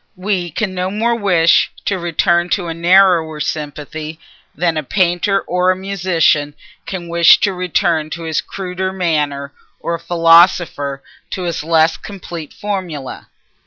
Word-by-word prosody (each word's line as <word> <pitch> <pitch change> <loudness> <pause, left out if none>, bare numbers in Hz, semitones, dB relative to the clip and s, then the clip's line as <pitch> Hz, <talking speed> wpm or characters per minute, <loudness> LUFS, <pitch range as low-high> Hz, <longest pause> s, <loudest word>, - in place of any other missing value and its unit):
We 185 -2 -2
can 190 +5 -3
no 185 0 -2
more 225 +4 0
wish 180 -7 +3 0.2
to 190 -2 -1
return 175 +1 +1
to 180 - -6
a 165 - -3
narrower 170 -2 +3
sympathy 155 +1 -5 0.4
than 170 0 0
a 155 - -1
painter 180 +5 +1
or 180 +1 0
a 185 - +3
musician 175 -6 0 0.3
can 180 -3 -5
wish 170 0 +5
to 195 - +1
return 175 -3 0
to 170 - -8
his 160 -1 -1
cruder 190 0 -4
manner, 150 -6 -2 0.3
or 170 - -3
a 170 - -3
philosopher 165 -4 +3 0.3
to 185 - -4
his 170 -3 -3
less 160 0 +2
complete 175 -6 -8
formula. 180 -10 -5
175 Hz, 145 wpm, -17 LUFS, 160-185 Hz, 0.4 s, wish